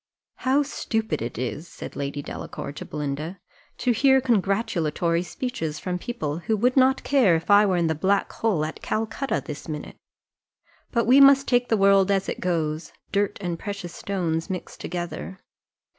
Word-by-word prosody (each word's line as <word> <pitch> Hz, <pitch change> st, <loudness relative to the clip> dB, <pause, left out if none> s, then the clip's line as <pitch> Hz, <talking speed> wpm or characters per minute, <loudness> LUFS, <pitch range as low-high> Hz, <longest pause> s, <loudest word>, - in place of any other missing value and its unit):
"How 270 Hz, +3 st, +2 dB
stupid 220 Hz, -, -2 dB
it 115 Hz, 0 st, -4 dB
is," 125 Hz, +7 st, -4 dB
said -, -, -9 dB
Lady 145 Hz, 0 st, -3 dB
Delacour -, -, -6 dB
to 145 Hz, -, -8 dB
Belinda, 150 Hz, +5 st, -4 dB, 0.4 s
"to 250 Hz, -, +1 dB
hear 265 Hz, +3 st, +5 dB
congratulatory 195 Hz, -, +1 dB
speeches 165 Hz, -5 st, -4 dB
from 180 Hz, +2 st, -3 dB
people, 160 Hz, -, -3 dB
who 220 Hz, +5 st, 0 dB
would 250 Hz, +4 st, +2 dB
not 265 Hz, 0 st, +4 dB
care 255 Hz, -11 st, +4 dB
if 165 Hz, +5 st, -2 dB
I 205 Hz, +1 st, +7 dB
were 185 Hz, -2 st, +2 dB
in 170 Hz, -, +2 dB
the 160 Hz, -, +1 dB
black 195 Hz, +6 st, +1 dB
hole 195 Hz, -9 st, 0 dB
at 155 Hz, -, -7 dB
Calcutta 225 Hz, +5 st, -2 dB
this 150 Hz, -3 st, -7 dB
minute; 150 Hz, -2 st, -6 dB, 0.9 s
but 235 Hz, -2 st, +1 dB
we 260 Hz, +4 st, +7 dB
must 275 Hz, 0 st, +7 dB
take 245 Hz, 0 st, +2 dB
the 225 Hz, -, +3 dB
world 195 Hz, -1 st, +5 dB
as 195 Hz, -1 st, +1 dB
it -, -, -3 dB
goes 160 Hz, -3 st, -2 dB, 0.2 s
dirt 200 Hz, 0 st, 0 dB
and 175 Hz, -3 st, -3 dB
precious 200 Hz, -4 st, -6 dB
stones 170 Hz, -3 st, -2 dB
mixed 185 Hz, -2 st, -6 dB
together. 175 Hz, +2 st, -5 dB
190 Hz, 170 wpm, -25 LUFS, 160-225 Hz, 0.9 s, I